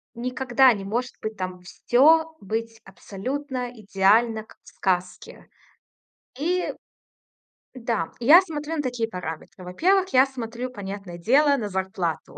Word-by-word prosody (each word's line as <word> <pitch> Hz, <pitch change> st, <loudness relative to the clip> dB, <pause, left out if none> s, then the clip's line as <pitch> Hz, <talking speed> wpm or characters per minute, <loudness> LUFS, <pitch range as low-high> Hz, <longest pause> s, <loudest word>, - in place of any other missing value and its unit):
никогда 255 Hz, +1 st, +3 dB
не 200 Hz, -3 st, -6 dB
может 240 Hz, +6 st, -3 dB
быть 215 Hz, -1 st, -5 dB
там 185 Hz, -1 st, -5 dB
всё 315 Hz, -, +3 dB
быть 225 Hz, +2 st, -4 dB
абсолютно 250 Hz, +7 st, -5 dB
идеально, 220 Hz, +1 st, +2 dB
как -, -, -20 dB
в -, -, -27 dB
сказке. 180 Hz, -1 st, -3 dB, 0.9 s
И, 355 Hz, +6 st, -1 dB, 1.0 s
да, 230 Hz, -9 st, -2 dB
и -, -, -4 dB
я 325 Hz, +8 st, +9 dB
смотрю 320 Hz, -3 st, -5 dB
на -, -, 0 dB
такие 245 Hz, -4 st, -2 dB
параметры. 180 Hz, -1 st, -7 dB
Во-первых, 370 Hz, -, +2 dB
я 260 Hz, +1 st, +7 dB
смотрю, 250 Hz, -2 st, -6 dB
понятное 195 Hz, -5 st, -7 dB
дело, 280 Hz, -, +3 dB
на 220 Hz, -5 st, -3 dB
зарплату. 190 Hz, -3 st, -3 dB
230 Hz, 130 wpm, -24 LUFS, 195-270 Hz, 1.0 s, я